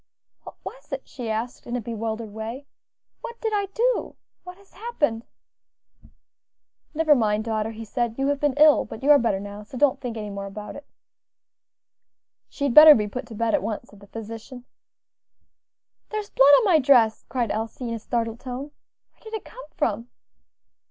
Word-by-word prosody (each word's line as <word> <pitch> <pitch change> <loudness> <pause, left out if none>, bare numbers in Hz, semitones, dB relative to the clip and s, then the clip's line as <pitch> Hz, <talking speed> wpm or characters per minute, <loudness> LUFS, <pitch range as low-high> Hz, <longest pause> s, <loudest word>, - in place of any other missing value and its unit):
"What - - -10
was - - -10
it?" - - -5
she 240 -3 -7
asked 225 +3 -4
in 240 - -3
a - - -1
bewildered 225 -1 -5
way; 225 +6 -6 0.6
"what 470 0 -8
did 445 -2 -2
I 405 -1 0
do? 475 +5 -1 0.3
what 360 0 -10
has 400 0 -23
happened?" 295 - -2 1.7
"Never 315 -1 +4
mind, 215 -5 +1
daughter," 220 -1 -2
he 225 0 -8
said, 235 0 -2
"you 270 +1 0
have 285 -1 0
been 290 -2 +1
ill; 300 0 +6
but 220 - -10
you 290 - +5
are 290 - +8
better 225 -5 0
now, 205 +1 -8
so 215 +5 -10
don't 275 0 +2
think 240 -3 -5
any 210 -1 -5
more 200 0 -6
about 210 +2 -8
it." 285 - -11 1.6
"She 280 - -6
had 280 -4 +1
better 305 +1 +11
be 210 -2 0
put 245 +4 -6
to 230 - -10
bed 230 +1 0
at - - +2
once," 210 +1 -5
said 205 - -17
the 200 - -16
physician. 225 +3 -9 1.4
"There 430 - -2
is 415 - -8
blood 270 - +5
on 475 - +2
my 350 -6 +5
dress," 245 -5 +4
cried 240 -4 -1
Elsie, 225 +3 -4
in - - -3
a 230 - -4
startled 230 0 -3
tone; 260 +3 -7 0.4
"where - - -36
did 440 0 -7
it 440 - -6
come - - -12
from?" 235 - -1
240 Hz, 190 wpm, -24 LUFS, 220-295 Hz, 1.7 s, better